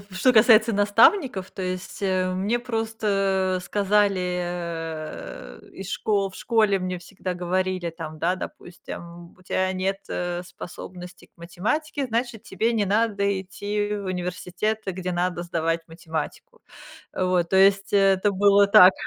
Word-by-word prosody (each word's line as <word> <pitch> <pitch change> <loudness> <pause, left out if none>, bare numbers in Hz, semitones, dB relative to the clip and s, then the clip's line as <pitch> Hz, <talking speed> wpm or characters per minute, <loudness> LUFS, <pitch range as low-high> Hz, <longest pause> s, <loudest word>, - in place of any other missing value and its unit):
что 250 +7 +4
касается 225 0 +6
наставников, 205 - +3
то 190 - -6
есть, 185 +2 -5
э, 185 -1 +1
мне 200 +6 0
просто, 210 -5 0
э, - - -7
сказали, 205 -1 +2 0.2
э, 165 -3 -6
из 195 0 -8
шко 200 -2 0
В - - -16
школе 215 -3 +2
мне 185 0 -3
всегда 185 +1 -6
говорили 180 0 -1
там, 155 -1 -8
да, 170 +4 +1
допустим: 170 -1 -9
"У - - -19
тебя 185 +1 0
нет, 190 +1 -1
э, 175 0 -3
способности 180 +1 -10
к - - -47
математике, 270 - -2
значит, 235 -1 -2
тебе 225 +5 -1
не 215 -3 +1
надо 200 -1 +1
идти 205 +2 -3
в 205 -1 -5
университет, 180 +3 -2
где 185 -1 -3
надо 175 0 -1
сдавать 165 -1 -1
математику". 165 - -6 0.5
Вот, 180 -2 +1
то 190 - +3
есть 195 0 +4
это 195 0 +4
было 200 +1 +5
так. 200 -2 +8
190 Hz, 140 wpm, -24 LUFS, 180-205 Hz, 0.5 s, так